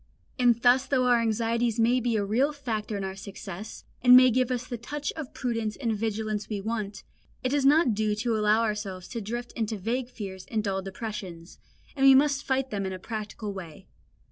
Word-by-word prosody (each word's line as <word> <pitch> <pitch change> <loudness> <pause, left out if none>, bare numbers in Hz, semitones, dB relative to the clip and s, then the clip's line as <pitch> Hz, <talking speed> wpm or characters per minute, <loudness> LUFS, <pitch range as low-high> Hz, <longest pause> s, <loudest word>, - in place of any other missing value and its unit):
And 240 -2 +4
thus 255 +2 +5
though 255 -2 +2
our 245 -1 +4
anxieties 230 +1 0
may 240 +3 +4
be 240 -1 0
a 205 -2 +1
real 250 +9 +2
factor 225 -7 -3
in 200 - -4
our 190 0 -4
success, 195 +1 -8 0.2
and 250 0 +9
may 255 0 +7
give 255 +1 +1
us 250 -1 -2
the 240 -3 -6
touch 290 +5 -4
of 310 -5 -6
prudence 230 -4 -2
and 230 -4 -1
vigilance 215 -1 -2
we 210 -2 -2
want, 210 -1 -4 0.4
it 255 - +1
does 275 0 +2
not 290 -4 +5
do 210 0 0
to 225 +2 -1
allow 215 +1 +3
ourselves 210 -4 -3
to 230 - -4
drift 240 +4 -5
into 220 -1 -3
vague 240 +6 -2
fears 190 -6 -8
and 220 -1 -1
dull 195 -2 -1
depressions, 190 -4 -7 0.4
and 270 - -1
we 270 - +9
must 280 0 +3
fight 265 0 -1
them 200 -2 -2
in 190 - -4
a - - -5
practical 215 0 -5
way. 190 0 -9
225 Hz, 205 wpm, -27 LUFS, 205-250 Hz, 0.4 s, and